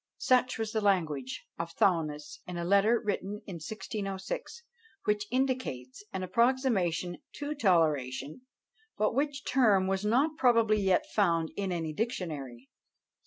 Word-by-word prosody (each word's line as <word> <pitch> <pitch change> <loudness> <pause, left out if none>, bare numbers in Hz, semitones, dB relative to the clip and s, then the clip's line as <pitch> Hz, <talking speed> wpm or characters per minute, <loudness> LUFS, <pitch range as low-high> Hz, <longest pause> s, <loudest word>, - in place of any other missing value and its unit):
Such 255 0 +2
was 220 -1 -2
the 220 - 0
language 160 -10 0
of 165 0 -4
Thuanus, 155 -5 0
in 180 -1 -5
a 170 - -2
letter 200 +5 +4
written 205 0 -3
in 185 -4 -6
1606; 200 - -5 0.4
which 210 0 0
indicates 250 - -2
an 190 - -3
approximation 190 - +1 0.2
to 290 +1 -4
toleration, 155 - +1 0.6
but 215 - +1
which 280 +1 -1
term 215 -8 +4
was 190 +1 -1
not 270 +9 +2
probably 230 -4 +4
yet 190 -2 +2
found 170 -6 +2
in 195 -2 -2
any 165 -3 -2
dictionary. 150 - -4
195 Hz, 130 wpm, -30 LUFS, 165-230 Hz, 0.6 s, letter